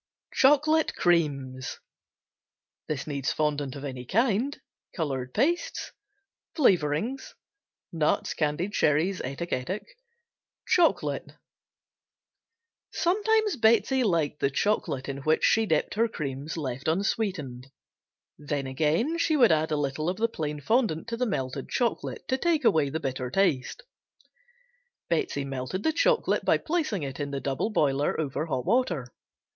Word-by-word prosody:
Chocolate 300 Hz, +3 st, +4 dB
Creams 140 Hz, -7 st, 0 dB, 1.6 s
Fondant 145 Hz, -3 st, -1 dB
of 140 Hz, -, -8 dB
any 130 Hz, -2 st, -5 dB
kind. 230 Hz, -, +1 dB, 0.4 s
Color 135 Hz, -7 st, -2 dB
pastes. 295 Hz, -, -1 dB, 0.6 s
Flavorings. 200 Hz, -, +1 dB, 0.6 s
Nuts, 160 Hz, -2 st, +1 dB
candied 160 Hz, +6 st, -1 dB
cherries, 160 Hz, +4 st, +2 dB
etc., 135 Hz, +3 st, -3 dB
etc. 185 Hz, +12 st, -5 dB, 0.8 s
Chocolate. 350 Hz, -2 st, +2 dB, 1.6 s
Sometimes 425 Hz, 0 st, +1 dB
Betsey 230 Hz, +4 st, +3 dB
liked 165 Hz, -8 st, 0 dB
the 140 Hz, -, +2 dB
chocolate 145 Hz, -3 st, -1 dB
in 140 Hz, -1 st, -4 dB
which 155 Hz, +3 st, +1 dB
she 220 Hz, 0 st, +4 dB
dipped 160 Hz, -4 st, +1 dB
her 230 Hz, +2 st, +2 dB
creams 145 Hz, -5 st, -5 dB
left 135 Hz, -3 st, -4 dB
unsweetened, 160 Hz, -, -1 dB, 0.7 s
then 145 Hz, -2 st, -3 dB
again 160 Hz, -, 0 dB
she 315 Hz, -2 st, +2 dB
would 240 Hz, -8 st, +6 dB
add 160 Hz, 0 st, +2 dB
a 150 Hz, -, +1 dB
little 145 Hz, +3 st, -1 dB
of 185 Hz, -, -2 dB
the 230 Hz, -, +2 dB
plain 150 Hz, -8 st, -4 dB
fondant 220 Hz, -, +1 dB
to 230 Hz, -, -2 dB
the 250 Hz, +1 st, -1 dB
melted 135 Hz, -, -3 dB
chocolate 240 Hz, -2 st, -2 dB
to 260 Hz, 0 st, 0 dB
take 335 Hz, -3 st, +1 dB
away 150 Hz, -3 st, +4 dB
the 160 Hz, +3 st, -3 dB
bitter 130 Hz, -3 st, -3 dB
taste. 185 Hz, -, 0 dB, 1.3 s
Betsey 350 Hz, -, 0 dB
melted 135 Hz, +8 st, -4 dB
the 320 Hz, -, +2 dB
chocolate 470 Hz, +8 st, +2 dB
by -, -, +3 dB
placing 305 Hz, -, -1 dB
it 135 Hz, 0 st, -5 dB
in 145 Hz, -1 st, -2 dB
the 140 Hz, -1 st, -3 dB
double 135 Hz, +10 st, -1 dB
boiler 145 Hz, -8 st, +1 dB
over 155 Hz, +1 st, -2 dB
hot 130 Hz, -5 st, -2 dB
water. 190 Hz, -, +1 dB
160 Hz, 130 wpm, -27 LUFS, 140-230 Hz, 1.6 s, would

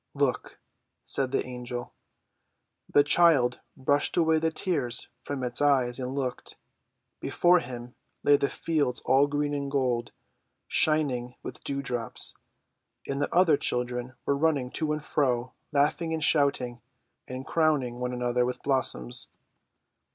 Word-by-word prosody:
"Look!" 140 Hz, -4 st, -1 dB, 0.5 s
said 130 Hz, -2 st, 0 dB
the -, -, 0 dB
Angel. 125 Hz, -1 st, -6 dB, 1.0 s
The 145 Hz, -, +5 dB
child 145 Hz, -5 st, +4 dB, 0.2 s
brushed 145 Hz, +4 st, +1 dB
away 160 Hz, -2 st, +4 dB
the 160 Hz, +1 st, +1 dB
tears 145 Hz, -9 st, 0 dB
from 135 Hz, 0 st, -4 dB
its 125 Hz, +1 st, -1 dB
eyes 135 Hz, -4 st, +3 dB
and 130 Hz, +1 st, -4 dB
looked. 130 Hz, -3 st, -4 dB, 0.6 s
Before 175 Hz, +1 st, +3 dB
them 120 Hz, 0 st, -8 dB, 0.3 s
lay 145 Hz, -, +6 dB
the 140 Hz, -, +1 dB
fields 150 Hz, -7 st, -1 dB
all 135 Hz, +2 st, +4 dB
green 145 Hz, 0 st, -1 dB
and 140 Hz, -1 st, -2 dB
gold, 125 Hz, -4 st, 0 dB, 0.6 s
shining 130 Hz, -6 st, +1 dB
with -, -, -8 dB
dewdrops, 130 Hz, -4 st, -3 dB, 0.7 s
and 140 Hz, +1 st, -2 dB
the -, -, -1 dB
other 175 Hz, -4 st, +5 dB
children 125 Hz, 0 st, -1 dB
were 140 Hz, -, +2 dB
running 140 Hz, -4 st, +1 dB
to 155 Hz, -2 st, -1 dB
and 150 Hz, 0 st, -3 dB
fro, 125 Hz, -3 st, 0 dB, 0.2 s
laughing 155 Hz, +3 st, +1 dB
and 160 Hz, -, -3 dB
shouting, 140 Hz, -6 st, +2 dB, 0.5 s
and 130 Hz, +1 st, -6 dB
crowning 145 Hz, -7 st, +1 dB
one 125 Hz, 0 st, -2 dB
another 125 Hz, 0 st, 0 dB
with 125 Hz, 0 st, -3 dB
blossoms. 125 Hz, -, 0 dB
135 Hz, 135 wpm, -28 LUFS, 125-145 Hz, 1.0 s, lay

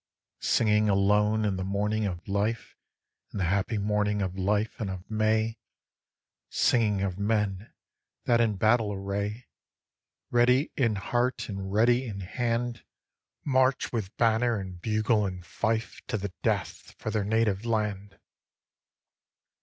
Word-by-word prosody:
Singing 105 Hz, -1 st, +3 dB
alone 105 Hz, +2 st, +3 dB
in 100 Hz, -2 st, 0 dB
the 95 Hz, -, -2 dB
morning 105 Hz, +2 st, 0 dB
of 90 Hz, -2 st, -6 dB
life, 105 Hz, +3 st, -1 dB, 0.6 s
In -, -, -6 dB
the 95 Hz, -, 0 dB
happy 100 Hz, +5 st, 0 dB
morning 105 Hz, 0 st, 0 dB
of 95 Hz, -1 st, -3 dB
life 105 Hz, +3 st, 0 dB
and 105 Hz, -4 st, -2 dB
of 95 Hz, -1 st, -7 dB
May, 110 Hz, +1 st, +1 dB, 0.9 s
Singing 105 Hz, -5 st, +2 dB
of 95 Hz, -1 st, -2 dB
men 105 Hz, -1 st, -1 dB, 0.5 s
that 120 Hz, -1 st, +4 dB
in 110 Hz, -3 st, +2 dB
battle 110 Hz, +2 st, +2 dB
array, 100 Hz, +4 st, -3 dB, 0.9 s
Ready 125 Hz, +4 st, +3 dB
in 115 Hz, -5 st, +2 dB
heart 120 Hz, +6 st, -1 dB
and 95 Hz, -1 st, -5 dB
ready 120 Hz, +5 st, +3 dB
in 100 Hz, -3 st, -5 dB
hand, 120 Hz, +4 st, -2 dB, 0.6 s
March 130 Hz, -2 st, +2 dB
with 105 Hz, -5 st, -3 dB
banner 115 Hz, 0 st, +2 dB
and 95 Hz, -2 st, -8 dB
bugle 110 Hz, 0 st, +1 dB
and 90 Hz, -2 st, -7 dB
fife 110 Hz, +3 st, -2 dB
To 120 Hz, -, -1 dB
the 100 Hz, -2 st, -5 dB
death, -, -, -2 dB
for 110 Hz, -, -4 dB
their 105 Hz, -2 st, 0 dB
native 105 Hz, -1 st, +1 dB
land. 105 Hz, -3 st, -2 dB
105 Hz, 135 wpm, -28 LUFS, 100-115 Hz, 0.9 s, that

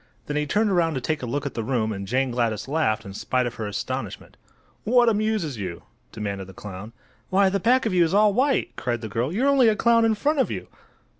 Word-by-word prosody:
Then 145 Hz, -, -4 dB
he 150 Hz, 0 st, 0 dB
turned 210 Hz, +6 st, +1 dB
around 165 Hz, -4 st, +2 dB
to -, -, -1 dB
take 155 Hz, +4 st, -2 dB
a 125 Hz, -, -4 dB
look 145 Hz, +4 st, -2 dB
at 140 Hz, -, -4 dB
the 115 Hz, -, -3 dB
room 110 Hz, -2 st, 0 dB
and 100 Hz, -1 st, -6 dB
Jane 130 Hz, +3 st, 0 dB
Gladys 115 Hz, -3 st, -1 dB
laughed 115 Hz, -8 st, 0 dB
in 100 Hz, -, -8 dB
spite 125 Hz, +5 st, -1 dB
of 120 Hz, -, -3 dB
her 105 Hz, -, -2 dB
astonishment. 105 Hz, -, -5 dB, 0.5 s
"What 240 Hz, +1 st, +4 dB
amuses 210 Hz, -, -1 dB
you?" 90 Hz, -4 st, -5 dB, 0.3 s
demanded 100 Hz, -3 st, -5 dB
the 95 Hz, -, -13 dB
clown. 105 Hz, +2 st, -8 dB, 0.4 s
"Why, 195 Hz, 0 st, +4 dB
the 200 Hz, +1 st, 0 dB
back 250 Hz, +6 st, +3 dB
of 220 Hz, -, 0 dB
you 180 Hz, -1 st, +5 dB
is 165 Hz, -, 0 dB
all 210 Hz, +1 st, +4 dB
white!" 265 Hz, +5 st, +1 dB
cried 120 Hz, 0 st, -2 dB
the 110 Hz, -, -6 dB
girl. 120 Hz, +7 st, -1 dB
"You're 240 Hz, +10 st, +1 dB
only 275 Hz, -4 st, +5 dB
a 220 Hz, -, +4 dB
clown 230 Hz, +1 st, +3 dB
in 225 Hz, -1 st, +3 dB
front 295 Hz, +7 st, 0 dB
of 265 Hz, -, +2 dB
you." -, -, -6 dB
150 Hz, 240 wpm, -24 LUFS, -, 0.5 s, you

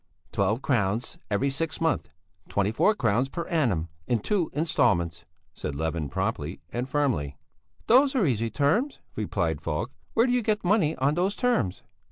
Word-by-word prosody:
"Twelve 105 Hz, +6 st, 0 dB
crowns 110 Hz, -3 st, 0 dB
every 120 Hz, +7 st, +1 dB
sixth 160 Hz, +4 st, -2 dB
month, 160 Hz, -5 st, 0 dB, 0.4 s
twenty 100 Hz, 0 st, +1 dB
four 210 Hz, -, +3 dB
crowns 120 Hz, -, +1 dB
per 170 Hz, +3 st, -4 dB
annum, 115 Hz, -, +1 dB, 0.2 s
in 120 Hz, -, +2 dB
two 175 Hz, -, 0 dB
instalments," 110 Hz, -, +1 dB, 0.3 s
said 70 Hz, -, -5 dB
Levin 80 Hz, 0 st, -2 dB
promptly -, -, -2 dB
and 125 Hz, +2 st, -2 dB
firmly. 130 Hz, -, 0 dB, 0.5 s
"Those 265 Hz, +4 st, +5 dB
are 230 Hz, -8 st, +3 dB
easy 115 Hz, -5 st, +1 dB
terms," 165 Hz, -, +1 dB, 0.2 s
replied 85 Hz, -7 st, -1 dB
Falk. 75 Hz, -2 st, -2 dB, 0.2 s
"Where 230 Hz, -, +5 dB
do 255 Hz, -, +1 dB
you 250 Hz, -, +3 dB
get 215 Hz, -1 st, 0 dB
money 175 Hz, -5 st, +3 dB
on 140 Hz, +3 st, +1 dB
those 185 Hz, +5 st, 0 dB
terms?" 140 Hz, -, 0 dB
130 Hz, 160 wpm, -27 LUFS, -, 0.5 s, Those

